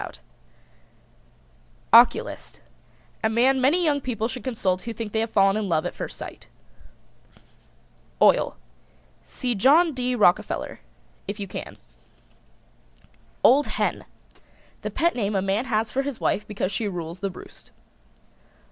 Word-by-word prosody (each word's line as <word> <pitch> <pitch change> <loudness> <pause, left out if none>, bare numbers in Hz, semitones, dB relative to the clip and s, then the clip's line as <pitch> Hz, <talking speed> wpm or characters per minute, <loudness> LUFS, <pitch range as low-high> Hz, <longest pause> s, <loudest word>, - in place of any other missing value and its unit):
OCULIST. 235 +2 +4 0.6
A 220 - +3
man 255 +4 +3
many 310 +8 +3
young 290 -3 +1
people 225 -4 -2
should 245 +1 -7
consult 190 -8 -1
who 235 - -6
think 225 -1 -6
they 220 - 0
have 225 +1 -1
fallen 195 -1 +3
in 215 -2 -2
love 160 -2 +1
at - - -3
first - - -7
sight. - - -9 1.7
OIL. - - +4 0.7
See 250 -2 -3
John 295 - +4
D. 250 -1 -1
Rockerfeller 205 -5 +1 0.5
if 200 +2 -5
you 200 - -4
can. - - -8 1.7
OLD 285 +3 +5
HEN. - - -2 0.8
The - - -3
pet 340 +1 +1
name 210 -3 -2
a 190 - +2
man 195 +5 0
has 220 -3 -1
for 270 - 0
his 275 -3 -5
wife 210 +1 -1
because 200 -2 -3
she 210 +2 -2
rules 170 -2 -6
the 195 - -2
roost. 180 - -13
225 Hz, 135 wpm, -24 LUFS, 200-255 Hz, 1.7 s, OLD